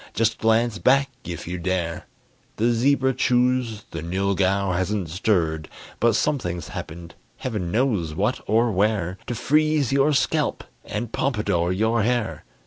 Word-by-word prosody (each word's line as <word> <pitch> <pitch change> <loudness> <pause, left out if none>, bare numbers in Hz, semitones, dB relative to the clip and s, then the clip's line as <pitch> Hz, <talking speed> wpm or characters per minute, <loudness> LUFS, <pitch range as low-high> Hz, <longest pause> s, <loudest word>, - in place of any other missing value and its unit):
Just 115 -1 +1
glance 115 -1 +2
back, 135 +7 +3
if 85 -1 -6
you 90 0 -4
dare. 90 -1 -2 0.5
The 115 +3 +2
zebra 130 +3 +2
chews, 125 -3 +1
the 80 - -5
nylghau 95 +2 0
hasn't 95 -1 -1
stirred; 80 -5 0 0.3
But 115 0 +3
something's 90 - -1
happened, 85 +5 -8 0.2
Heaven 105 -9 -3
knows 105 - 0
what - - 0
or 115 +3 +3
where, 95 -2 0
To 120 - -2
freeze 150 +1 +2
your 140 +2 +3
scalp - - 0 0.2
and 120 -2 -4
pompadour 105 -9 0
your 110 +4 +1
hair. 120 +1 -1
105 Hz, 135 wpm, -23 LUFS, 90-120 Hz, 0.5 s, back